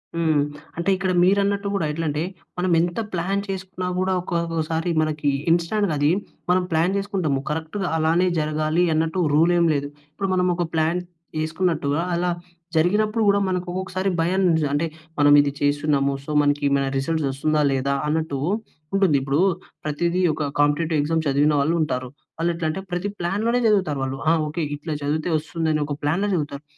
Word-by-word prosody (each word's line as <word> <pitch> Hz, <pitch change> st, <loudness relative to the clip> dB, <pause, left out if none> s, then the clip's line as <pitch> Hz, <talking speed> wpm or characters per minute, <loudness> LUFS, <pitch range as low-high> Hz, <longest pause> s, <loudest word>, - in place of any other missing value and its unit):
హ్మ్. 160 Hz, -3 st, +2 dB, 0.4 s
అంటే 170 Hz, +3 st, -1 dB
ఇక్కడ 190 Hz, 0 st, -1 dB
మీరన్నట్టు 200 Hz, +1 st, +2 dB
కూడా 180 Hz, -6 st, 0 dB
ఎట్లంటే, 150 Hz, -1 st, -2 dB, 0.4 s
మనం 180 Hz, 0 st, 0 dB
ఎంత 175 Hz, +5 st, 0 dB
ప్లాన్ 190 Hz, +3 st, 0 dB
చేసుకున్నా 185 Hz, -1 st, -4 dB
కూడా 185 Hz, +1 st, +1 dB
ఒకొక్కసారి 165 Hz, -1 st, -1 dB
మనకి 150 Hz, -2 st, 0 dB, 0.2 s
ఇన్స్టాంట్‌గా 175 Hz, +2 st, +1 dB
అది 145 Hz, +2 st, +3 dB, 0.4 s
మనం 180 Hz, 0 st, +3 dB
ప్లాన్ 170 Hz, +5 st, +2 dB
చేసుకుంటాము 185 Hz, -8 st, -1 dB
కరెక్ట్‌గా 160 Hz, +5 st, -3 dB
అలానే 165 Hz, +3 st, +2 dB
జరగాలి 155 Hz, +2 st, +1 dB
అన్నట్టు 160 Hz, +3 st, 0 dB
రూల్ 165 Hz, +4 st, +4 dB
ఏమి 170 Hz, -1 st, +3 dB
లేదు. 145 Hz, 0 st, -1 dB, 0.2 s
ఇప్పుడు 195 Hz, +5 st, -3 dB
మనం 180 Hz, 0 st, +2 dB
ఒక 175 Hz, -1 st, -1 dB
ప్లాన్ 160 Hz, +3 st, +1 dB, 0.4 s
యేసుకున్నట్టుగా 160 Hz, -2 st, 0 dB
అలా 175 Hz, +1 st, 0 dB, 0.5 s
జరిగినప్పుడు 210 Hz, +7 st, +2 dB
కూడా 200 Hz, -, +4 dB
మనకు 180 Hz, -1 st, -2 dB
ఒక్కొక్కసారి 190 Hz, +1 st, -2 dB
భయం, 185 Hz, +3 st, +1 dB, 0.3 s
అంటే 155 Hz, +3 st, +1 dB, 0.3 s
మనం 145 Hz, 0 st, +6 dB
ఇది 140 Hz, -1 st, 0 dB
చేస్తున్నాము 145 Hz, -1 st, +1 dB
సో, 150 Hz, -, -5 dB
మనకి 145 Hz, 0 st, +1 dB
ఏమైనా 140 Hz, -1 st, +1 dB
రిజల్ట్స్ 150 Hz, +1 st, 0 dB
వస్తుందా, 155 Hz, +3 st, 0 dB
లేదా 135 Hz, +1 st, 0 dB
అన్నట్టు 155 Hz, -2 st, -1 dB, 0.6 s
ఉంటుంది. 190 Hz, -7 st, +3 dB
ఇప్పుడు 140 Hz, +2 st, 0 dB, 0.5 s
ప్రతిదీ 170 Hz, +4 st, 0 dB
ఒక 150 Hz, -, -3 dB, 0.2 s
కాంపిటేటివ్ 150 Hz, +2 st, +2 dB
ఎగ్జామ్ 160 Hz, +2 st, 0 dB
చదివిన 145 Hz, +2 st, +3 dB
వాళ్ళు 155 Hz, +4 st, +2 dB
ఉంటారు. 125 Hz, -4 st, -2 dB, 0.3 s
వాళ్ళు 170 Hz, +1 st, +1 dB
ఎట్లంటే 165 Hz, +2 st, -2 dB
ప్రతి 180 Hz, +3 st, -1 dB
ప్లాన్‌ 195 Hz, +6 st, -1 dB
లోనే 245 Hz, +1 st, +2 dB
చదువుతారు 185 Hz, -10 st, +2 dB
వాళ్ళు. 135 Hz, +1 st, -3 dB
ఆ! -, -, +5 dB
ఓకె, 160 Hz, +2 st, -3 dB
ఇట్లా 155 Hz, +1 st, -5 dB
చదివితే 155 Hz, +4 st, -1 dB
వస్తుందని, 155 Hz, -1 st, -1 dB
ఒక 145 Hz, -, -3 dB
ప్లాన్‌లో 175 Hz, +8 st, +1 dB
చదువుతారు. 145 Hz, -2 st, -3 dB
165 Hz, 160 wpm, -23 LUFS, 150-185 Hz, 0.6 s, మనం